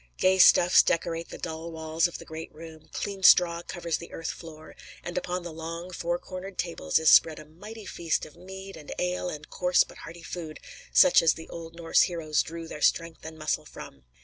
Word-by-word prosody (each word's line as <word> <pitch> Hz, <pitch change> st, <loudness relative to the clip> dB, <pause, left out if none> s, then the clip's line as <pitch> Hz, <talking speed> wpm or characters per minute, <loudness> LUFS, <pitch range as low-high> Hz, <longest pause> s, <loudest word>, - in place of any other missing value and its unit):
Gay 190 Hz, 0 st, +3 dB
stuffs 180 Hz, 0 st, +7 dB
decorate 165 Hz, 0 st, -1 dB
the -, -, -8 dB
dull 165 Hz, 0 st, -6 dB
walls 160 Hz, +1 st, 0 dB
of 175 Hz, -, -8 dB
the -, -, -12 dB
great 160 Hz, +1 st, -8 dB
room, 160 Hz, 0 st, -13 dB
clean 200 Hz, -1 st, -5 dB
straw 170 Hz, -2 st, +6 dB
covers 170 Hz, -2 st, -3 dB
the 170 Hz, -, -11 dB
earth 165 Hz, -, -4 dB
floor, 155 Hz, -1 st, -12 dB, 0.3 s
and 175 Hz, -, -6 dB
upon 180 Hz, 0 st, -3 dB
the 170 Hz, -2 st, -7 dB
long, 165 Hz, +3 st, -7 dB
four 175 Hz, 0 st, -2 dB
cornered 185 Hz, +2 st, -9 dB
tables 165 Hz, -, -1 dB
is 160 Hz, -, 0 dB
spread 160 Hz, -1 st, +6 dB
a -, -, -10 dB
mighty 205 Hz, +8 st, -11 dB
feast 170 Hz, -3 st, -2 dB
of 150 Hz, -, -15 dB
mead 190 Hz, +1 st, -10 dB
and 150 Hz, -2 st, -11 dB
ale 180 Hz, 0 st, -1 dB
and 150 Hz, -2 st, -9 dB
coarse 180 Hz, -1 st, +3 dB
but -, -, -15 dB
hearty 165 Hz, 0 st, -10 dB
food, 165 Hz, -3 st, -7 dB, 0.3 s
such 275 Hz, -, +6 dB
as 165 Hz, -2 st, +3 dB
the 160 Hz, -, -10 dB
old 165 Hz, 0 st, -9 dB
Norse 165 Hz, -1 st, +3 dB
heroes 160 Hz, -4 st, +1 dB
drew 165 Hz, 0 st, -7 dB
their 150 Hz, -, -8 dB
strength 165 Hz, +1 st, +1 dB
and 160 Hz, 0 st, -9 dB
muscle 155 Hz, 0 st, -1 dB
from. 70 Hz, -, -12 dB
165 Hz, 205 wpm, -27 LUFS, 160-180 Hz, 0.3 s, stuffs